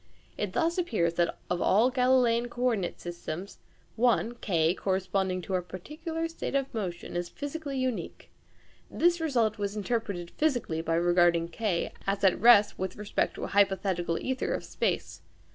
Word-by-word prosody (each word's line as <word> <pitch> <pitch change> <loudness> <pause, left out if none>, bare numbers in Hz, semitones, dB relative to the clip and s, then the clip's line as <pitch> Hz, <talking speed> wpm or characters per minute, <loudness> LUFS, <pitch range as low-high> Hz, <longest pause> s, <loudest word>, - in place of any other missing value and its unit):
It 205 -3 -3
thus 335 - +1
appears 210 - +1
that, 170 0 0
of 180 0 -1
all 225 +6 +4
Galileian 250 -2 +3
co 245 +1 -5
ordinate 220 -8 0
systems, 175 +1 -6 0.4
one 235 0 +2
(K) 170 -8 +1
corresponding 190 -1 -1
to 190 - -5
a 185 - +2
particular 315 - -5
state 330 -3 -5
of 275 -1 -1
motion 180 -6 -4
is 175 0 -2
physically 285 -1 -5
unique. 255 -3 -3 0.6
This 345 0 +2
result 235 -8 +1
was 200 0 -2
interpreted 205 -5 -2
physically 245 - 0
by 165 0 0
regarding 175 -1 +3
K 185 -1 -1
as 200 0 -1
at 190 -2 +3
rest 210 -3 +6
with 190 0 -3
respect 210 0 -1
to - - -6
a - - -2
hypothetical 190 -4 +1
ćther 260 +6 -1
of - - -5
space. - - -2
205 Hz, 160 wpm, -29 LUFS, 175-250 Hz, 0.6 s, rest